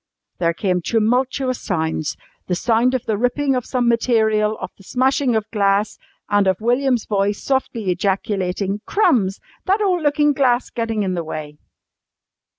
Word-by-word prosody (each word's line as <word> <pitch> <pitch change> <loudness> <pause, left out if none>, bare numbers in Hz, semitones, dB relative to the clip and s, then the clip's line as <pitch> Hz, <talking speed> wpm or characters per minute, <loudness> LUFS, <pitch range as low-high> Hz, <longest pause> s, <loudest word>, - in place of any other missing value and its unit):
There 170 -1 +1
came 180 -2 0
tumultuous 250 +5 0
sounds 160 -5 -2 0.3
the 180 - 0
sound 235 +6 +2
of 255 - -3
the 210 -2 -1
ripping 270 +3 +1
of 250 -2 -2
some 250 -2 0
material, 220 -2 +2
of - - -6
the 195 - -18
smashing 260 +2 +1
of 220 -1 0
glass 200 0 +1 0.3
and 205 -1 +2
of 185 -1 +1
William's 245 +1 +1
voice 205 0 0
softly 235 -7 -1
ejaculating 195 +1 -1
"Crumbs! 210 - +2 0.3
that 390 +3 +3
ole 375 -4 +1
lookin' 295 0 +2
glass 255 -3 +1
gettin' 225 -3 -2
in 185 -1 -1
the 170 -2 -2
way!" 150 -1 -7
220 Hz, 155 wpm, -20 LUFS, 195-255 Hz, 0.3 s, that